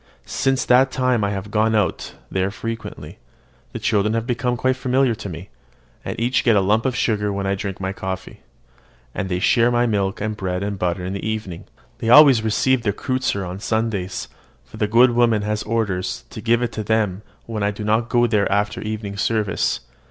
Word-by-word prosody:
Since 135 Hz, -1 st, 0 dB
that 130 Hz, +2 st, +5 dB
time 125 Hz, -4 st, +1 dB
I 100 Hz, -, +1 dB
have 100 Hz, 0 st, -5 dB
gone 110 Hz, +1 st, +2 dB
out 100 Hz, -6 st, -1 dB, 0.2 s
there 95 Hz, 0 st, 0 dB
frequently. 115 Hz, +3 st, -7 dB, 0.5 s
The -, -, -5 dB
children 105 Hz, 0 st, +1 dB
have 115 Hz, 0 st, -1 dB
become 125 Hz, 0 st, -1 dB
quite 130 Hz, +2 st, +1 dB
familiar 130 Hz, 0 st, +1 dB
with 110 Hz, -2 st, -5 dB
me; 85 Hz, +2 st, -8 dB, 0.5 s
and -, -, -5 dB
each 120 Hz, +3 st, +1 dB
gets 115 Hz, -4 st, +4 dB
a -, -, +4 dB
lump 105 Hz, +5 st, +2 dB
of 130 Hz, -, -1 dB
sugar 105 Hz, -4 st, 0 dB
when 100 Hz, 0 st, -3 dB
I 95 Hz, -, +1 dB
drink 100 Hz, -1 st, -4 dB
my 95 Hz, 0 st, -3 dB
coffee, 95 Hz, -1 st, -6 dB, 0.7 s
and 95 Hz, -, -3 dB
they 90 Hz, -, 0 dB
share 115 Hz, +6 st, +3 dB
my 120 Hz, 0 st, +2 dB
milk 100 Hz, -4 st, 0 dB
and 105 Hz, +1 st, -2 dB
bread 95 Hz, -1 st, -3 dB
and 100 Hz, -1 st, -3 dB
butter 90 Hz, 0 st, -1 dB
in 95 Hz, -, -3 dB
the 100 Hz, -, -5 dB
evening. 110 Hz, -6 st, -4 dB, 0.3 s
They 115 Hz, -, -2 dB
always 135 Hz, -2 st, +8 dB
receive 120 Hz, +4 st, +1 dB
their 105 Hz, -3 st, 0 dB
kreutzer 130 Hz, -4 st, -2 dB
on 90 Hz, +2 st, -6 dB
Sundays, 110 Hz, -4 st, -2 dB, 0.4 s
for 65 Hz, -, -13 dB
the 105 Hz, -, 0 dB
good 120 Hz, +4 st, +5 dB
woman 115 Hz, -3 st, +2 dB
has 105 Hz, +1 st, -1 dB
orders 105 Hz, -, -2 dB
to -, -, -7 dB
give 120 Hz, +1 st, +2 dB
it 120 Hz, -, -1 dB
to 110 Hz, -1 st, -4 dB
them 105 Hz, -3 st, 0 dB, 0.2 s
when 110 Hz, -2 st, -4 dB
I 100 Hz, -, +2 dB
do 105 Hz, +1 st, -6 dB
not 110 Hz, +3 st, +1 dB
go 120 Hz, -1 st, +3 dB
there 105 Hz, -4 st, +1 dB
after 105 Hz, +1 st, 0 dB
evening 105 Hz, -2 st, -5 dB
service. 110 Hz, -1 st, 0 dB
110 Hz, 205 wpm, -21 LUFS, 100-120 Hz, 0.7 s, always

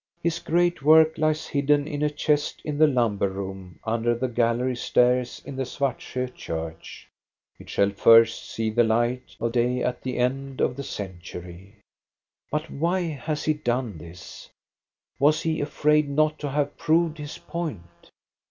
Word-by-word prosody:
His 170 Hz, 0 st, 0 dB
great 175 Hz, 0 st, +1 dB
work 160 Hz, +2 st, +6 dB
lies 155 Hz, 0 st, +1 dB
hidden 145 Hz, 0 st, +1 dB
in 145 Hz, -2 st, -4 dB
a 150 Hz, -, +2 dB
chest 150 Hz, 0 st, 0 dB
in 150 Hz, -1 st, -3 dB
the 155 Hz, -, +7 dB
lumber 115 Hz, -8 st, +1 dB
room 95 Hz, -3 st, -7 dB
under 115 Hz, +1 st, 0 dB
the 130 Hz, +2 st, -1 dB
gallery 120 Hz, +1 st, 0 dB
stairs 125 Hz, 0 st, +1 dB
in 140 Hz, -, -7 dB
the 135 Hz, -, -1 dB
Svartsjo 130 Hz, -1 st, -3 dB
church; 80 Hz, -5 st, -7 dB, 0.5 s
it -, -, -13 dB
shall 100 Hz, 0 st, +2 dB
first 115 Hz, +3 st, +5 dB
see 110 Hz, -1 st, -2 dB
the 120 Hz, +2 st, +3 dB
light 120 Hz, +3 st, 0 dB
of 115 Hz, +1 st, -1 dB
day 125 Hz, +1 st, +1 dB
at 125 Hz, -, -2 dB
the 130 Hz, -1 st, -4 dB
end 135 Hz, +2 st, -1 dB
of 125 Hz, -, +1 dB
the 140 Hz, -, -5 dB
century. 90 Hz, -2 st, -8 dB, 0.7 s
But 150 Hz, +1 st, -3 dB
why 170 Hz, +5 st, 0 dB
has 150 Hz, +1 st, -4 dB
he 155 Hz, -, +2 dB
done 120 Hz, -, -2 dB
this? 85 Hz, +2 st, -11 dB, 0.7 s
Was 150 Hz, +3 st, +3 dB
he 160 Hz, -1 st, 0 dB
afraid 150 Hz, 0 st, +2 dB
not 155 Hz, +2 st, +1 dB
to 145 Hz, -, -3 dB
have 145 Hz, +1 st, -1 dB
proved 160 Hz, 0 st, +2 dB
his 145 Hz, 0 st, -7 dB
point? 90 Hz, -, -7 dB
130 Hz, 160 wpm, -25 LUFS, 115-150 Hz, 0.7 s, the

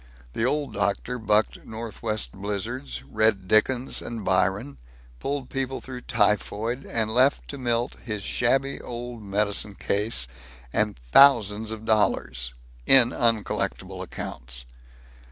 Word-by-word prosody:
The 115 Hz, -, 0 dB
Old 140 Hz, -2 st, -1 dB
Doctor 100 Hz, +5 st, -1 dB
bucked 110 Hz, -1 st, +1 dB
northwest 110 Hz, -1 st, -4 dB
blizzards, 95 Hz, -11 st, -4 dB
read 105 Hz, +4 st, +1 dB
Dickens 120 Hz, +5 st, +2 dB
and 115 Hz, -4 st, -6 dB
Byron, 95 Hz, -7 st, 0 dB, 0.4 s
pulled 140 Hz, -, -3 dB
people 135 Hz, -1 st, -2 dB
through 130 Hz, -1 st, -8 dB
typhoid, 110 Hz, +3 st, 0 dB
and 110 Hz, -1 st, 0 dB
left 130 Hz, +4 st, +3 dB
to 140 Hz, -, -6 dB
Milt 120 Hz, -1 st, -1 dB
his 105 Hz, -4 st, -4 dB
shabby 135 Hz, +6 st, +1 dB
old 120 Hz, -1 st, -7 dB
medicine 100 Hz, 0 st, -1 dB
case 100 Hz, -, +1 dB, 0.5 s
and 105 Hz, -1 st, 0 dB
thousands 110 Hz, -, +6 dB
of 110 Hz, 0 st, -7 dB
dollars 65 Hz, -, 0 dB, 0.3 s
in 130 Hz, -3 st, +8 dB
uncollectible 115 Hz, -3 st, -1 dB
accounts. 60 Hz, -1 st, -7 dB
110 Hz, 120 wpm, -25 LUFS, 100-120 Hz, 0.5 s, in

